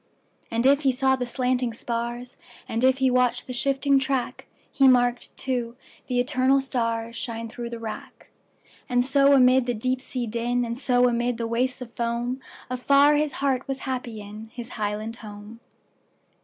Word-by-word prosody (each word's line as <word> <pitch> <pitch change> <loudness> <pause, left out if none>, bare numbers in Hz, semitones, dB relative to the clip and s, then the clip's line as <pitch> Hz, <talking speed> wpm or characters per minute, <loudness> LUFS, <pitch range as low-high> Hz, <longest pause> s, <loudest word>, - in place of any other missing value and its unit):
And 230 +2 0
if 280 +2 +5
he 275 -3 +3
saw 265 +1 +2
the 250 -2 -3
slanting 250 -2 -1
spars, 240 +1 -4 0.3
And 230 +2 -2
if 260 0 +4
he 265 -1 +2
watched 250 -1 +2
the 255 - -6
shifting 275 +2 +2
track, 265 -2 -2 0.2
He 275 - +4
marked, 245 -1 +2
too, 245 -3 -2 0.3
the 250 -1 0
eternal 260 +1 +3
starsShine 230 -3 -3
through 240 0 -6
the 235 - -6
wrack. 225 -1 -8 0.6
And 245 0 +2
so 275 +1 +4
amid 255 -1 +5
the 245 - 0
deep 255 +4 -1
sea 255 -2 -4
din, 240 +2 -1
And 235 0 -3
so 250 -1 +3
amid 240 0 0
the 230 - -2
wastes 250 +3 -1
of 235 -2 -8
foam, 235 +2 -2 0.3
Afar 280 +3 +4
his 295 -1 0
heart 270 -1 -1
was 270 -1 -4
happy 250 -3 -4
inHis 220 +3 -9
highland 215 0 -3
home! 210 +1 -11
245 Hz, 165 wpm, -25 LUFS, 235-260 Hz, 0.6 s, if